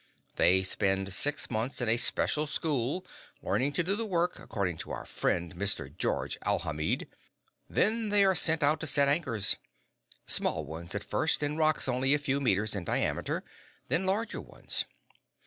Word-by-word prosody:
They 95 +1 +3
spend 95 0 0
six 145 +7 +4
months 115 +4 -2
in 120 - 0
a 110 - +3
special 150 +4 +1
school, 145 +2 -2 0.4
learning 140 +3 0
to 180 - 0
do 190 +4 0
the 230 - -2
work, 175 -2 -1
according 90 -6 -3
to - - -8
our - - -6
friend, 85 -1 -2
Mr. 100 0 -1
Georges - - -2
Alhamid. 75 0 -1 0.6
Then 220 +1 +1
they 205 -1 +5
are 190 - +4
sent 160 -2 +5
out 150 +2 +3
to 160 - -1
set 140 -1 +4
anchors. 140 - +1 0.7
Small 80 - +3
ones, 80 +3 -7
at - - -3
first, - - 0
in 145 +1 -1
rocks 155 -3 +2
only 130 +2 +2
a - - +2
few 140 -1 -1
meters 110 -5 +1
in 100 -3 -3
diameter - - -1 0.5
then 180 +3 +1
larger 210 +4 -1
ones. - - -4
140 Hz, 165 wpm, -29 LUFS, 100-160 Hz, 0.7 s, they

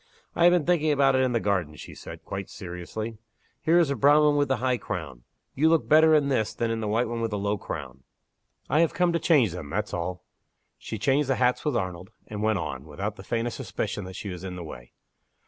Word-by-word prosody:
"I 170 - +4
have 175 - +8
been 175 -4 +2
thinking 160 -3 +2
about 135 -2 +4
it 130 - +3
in 130 -1 +2
the 115 - +1
garden," 95 -8 -1
she - - -10
said, - - -10
quite 100 0 -5
seriously. 105 +5 -6 0.4
"Here 165 +2 +3
is 170 -4 +4
the 140 - 0
brown 145 +5 +5
one 150 -1 +4
with 145 -1 +2
the 130 - +2
high 125 +1 +1
crown. 70 -9 -6 0.3
You 155 +4 +3
look 165 -1 +2
better 155 +1 +6
in 145 -2 +3
this 120 -6 0
than 115 -1 -1
in 115 - -1
the 110 - -3
white 115 +3 +1
one 115 0 -3
with 115 - 0
the 105 - -2
low 100 +1 -1
crown. 65 -6 -7 0.7
I 150 - +2
have 165 -1 +2
come 175 -1 +2
to 170 - +1
change 140 - +4
them, 80 -4 -7
that's 105 +5 -3
all." 90 +1 -3 0.6
She 110 - -6
changed 135 +6 +1
the 135 - +3
hats 125 0 +1
with 150 -5 0
Arnold, 95 -2 -4 0.2
and 105 -1 -6
went 110 -1 +2
on, 70 -5 -5
without 95 +8 -4
the 95 - -11
faintest 115 +3 -2
suspicion 100 - -4
that 95 0 -9
she 100 - -6
was 90 -1 -7
in 95 -1 -5
the 90 - -6
way. - - -10
110 Hz, 245 wpm, -26 LUFS, 90-140 Hz, 0.7 s, have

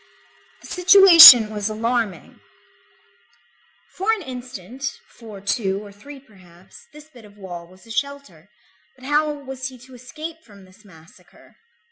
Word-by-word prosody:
The - - -15
situation 345 - +7
was 210 0 -5
alarming. 225 -4 -5 1.5
For 390 +4 -3
an 435 -4 -4
instant, 255 - -9
for 220 -4 -14
two 200 0 -4
or 205 - -14
three 275 +8 -15
perhaps, 185 -7 -21
this 300 +1 -17
bit 240 -5 -18
of 205 -1 -20
wall 175 -4 -11
was 185 +4 -22
a 225 - -15
shelter, 280 +3 -7 0.5
but 260 -1 -17
how 300 +2 -1
was 265 -2 -9
he 260 -1 -14
to 255 +2 -19
escape 305 +7 -11
from 200 -4 -19
this 185 +3 -23
massacre? 165 -2 -22
240 Hz, 140 wpm, -19 LUFS, 200-280 Hz, 1.5 s, situation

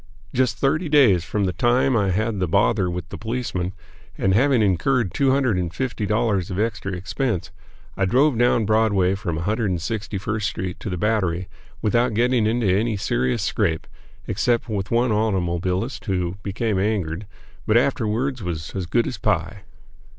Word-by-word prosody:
Just 130 -1 +1
thirty 155 +4 +1
days 125 - +5
from 100 +4 -2
the 90 -2 0
time 120 +7 +2
I 100 -3 +2
had 105 +2 0
the 90 - 0
bother 100 +2 +2
with 90 -1 -4
the - - -7
policemen, 110 -6 -3 0.5
and 95 - +2
having 125 +1 +4
incurred 105 +4 +1
two 140 -1 +2
hundred 130 -6 +2
and 85 -2 -2
fifty 110 +1 -3
dollars 105 -4 +1
of 90 - -4
extra 105 -3 -1
expense, 95 +1 -2 0.4
I 95 - +1
drove 130 +7 +3
down 120 -1 +3
Broadway 100 -4 +2
from 95 -5 -3
161st 105 +2 -2
Street 95 -4 -3
to - - -5
the 90 - -3
Battery, 95 -3 0 0.4
without 120 +1 +2
getting 120 -1 +2
into 115 +1 0
any 105 +4 +1
serious 65 -9 0
scrape, 80 -1 0 0.4
except 120 -1 0
with 100 -4 -3
one 120 +1 +2
automobilist 95 +1 -1
who 90 -1 -1
became 100 0 -1
angered, 100 -3 -1 0.4
but 110 - +4
afterwards 125 0 0
was 80 -4 -4
"as 95 -3 -3
good - - +2
as - - -5
pie." - - -1
105 Hz, 160 wpm, -22 LUFS, 95-120 Hz, 0.5 s, days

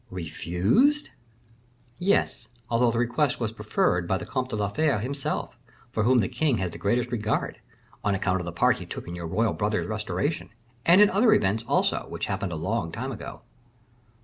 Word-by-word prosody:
"Refused?" 95 - +1 0.9
"Yes, 180 - +1 0.2
although 120 +1 +4
the 115 - -1
request 120 +4 +1
was 115 -3 -1
preferred 105 -5 0
by 95 - +1
the - - -6
Comte 130 -2 -2
de 110 - -3
la 105 -2 0
Fere 140 +4 +1
himself, 135 +6 -3 0.4
for 110 - -1
whom 120 +2 +4
the 95 - 0
king 130 +1 +1
has 95 -3 -2
the 85 - -9
greatest 120 +6 0
regard, 110 -2 -1 0.4
on 100 -1 +1
account 95 -1 0
of - - -6
the 85 - -4
part 85 - +3
he - - -8
took - - -7
in 85 - -6
your 85 -1 -5
royal 110 +7 +1
brother's 105 +1 -1
restoration, 115 +9 -2 0.4
and 180 +4 +7
in 210 - +7
other 215 +3 +5
events, 105 +3 +1
also, - - +1
which - - -3
happened - - -3
a - - -3
long - - -2
time - - -4
ago." - - -8
115 Hz, 190 wpm, -26 LUFS, 95-130 Hz, 0.9 s, and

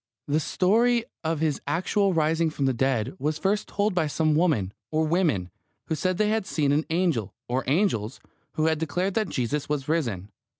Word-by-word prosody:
The 150 +2 +2
story 230 - +2 0.2
of 160 -1 -1
His 155 -3 0
actual 190 +6 +1
rising 160 0 +2
from 145 -3 -2
the 135 - +2
dead 125 -3 0
was 150 +2 -1
first 200 +5 0
told 205 0 0
by 175 -4 +1
some 155 +1 +1
woman, 150 - +1 0.2
or 155 0 +1
women, 155 - +1 0.4
who - - +1
said 185 +3 0
they 210 +1 +2
had 215 -2 0
seen 145 -6 +1
an 150 +2 +1
angel, 165 - 0
or 125 +2 -1
angels, 135 - +1 0.3
who 155 - 0
had 160 -1 +2
declared 175 +5 -1
that 215 -1 0
Jesus 135 +4 -2
was 145 -2 -2
risen. 115 - -1
155 Hz, 185 wpm, -26 LUFS, 140-185 Hz, 0.4 s, The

